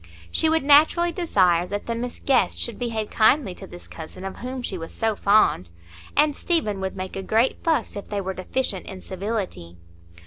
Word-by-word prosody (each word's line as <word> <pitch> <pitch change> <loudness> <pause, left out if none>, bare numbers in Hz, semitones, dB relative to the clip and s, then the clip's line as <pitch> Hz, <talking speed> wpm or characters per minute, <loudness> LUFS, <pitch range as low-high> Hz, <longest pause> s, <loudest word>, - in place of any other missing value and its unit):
She 320 - +2
would 320 -1 +2
naturally 310 +4 +5
desire 185 - +2
that 205 +1 -4
the 230 - -2
Miss 240 +1 -5
Guests 270 - +2
should 235 -3 -3
behave 225 -3 -3
kindly 220 -1 +3
to 190 +2 -11
this 175 -1 -12
cousin 165 +4 -9
of 195 - -6
whom 255 +1 -5
she 195 - -3
was 165 -2 -7
so 225 -2 -1
fond, 200 - +3 0.5
and 295 -1 +4
Stephen 215 - 0
would 190 0 -3
make 185 0 -5
a 195 - -3
great 225 +6 +1
fuss 315 -9 0
if 200 - -7
they 205 - -2
were 190 -1 -3
deficient 190 +1 -3
in 190 -1 -8
civility. 185 - -4
215 Hz, 195 wpm, -24 LUFS, 190-260 Hz, 0.5 s, naturally